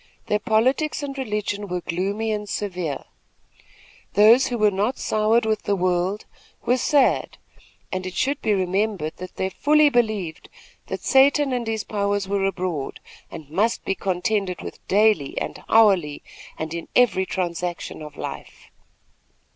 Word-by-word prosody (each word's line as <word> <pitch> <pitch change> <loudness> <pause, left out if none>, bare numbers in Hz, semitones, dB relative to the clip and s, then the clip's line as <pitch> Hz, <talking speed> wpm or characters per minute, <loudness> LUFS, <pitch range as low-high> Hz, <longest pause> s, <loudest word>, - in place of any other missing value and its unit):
Their 210 - +1
politics 255 +9 +1
and 275 -1 -4
religion 210 -5 -3
were 180 -1 -3
gloomy 200 +7 -2
and 210 -1 -3
severe. 180 -9 -3 1.1
Those 230 +6 +6
who 245 - -2
were 215 -2 +4
not 205 +7 -1
soured 220 +2 +2
with 215 -1 0
the 200 - 0
world 185 +2 0 0.4
were 250 +2 +3
sad, 275 +1 +2 0.5
and, 185 0 -3
it 185 - -7
should 275 +6 0
be 215 - 0
remembered, 190 -3 -1 0.2
they 190 - -1
fully 300 +7 +4
believed 215 - -1 0.4
that - - -5
Satan 275 0 +4
and 240 -2 -2
his 220 -1 -2
powers 200 -1 -1
were 195 0 0
abroad 180 -7 -3 0.3
and 155 - -9
must 215 +8 0
be - - +1
contended 190 0 -1
with - - -9
daily 205 -8 +2
and - - -6
hourly 190 -10 +4 0.3
and 160 0 -4
in 170 -1 -5
every 195 -7 +3
transaction 175 -2 -3
of 150 -1 -10
life. - - -8
205 Hz, 145 wpm, -23 LUFS, 185-225 Hz, 1.1 s, Those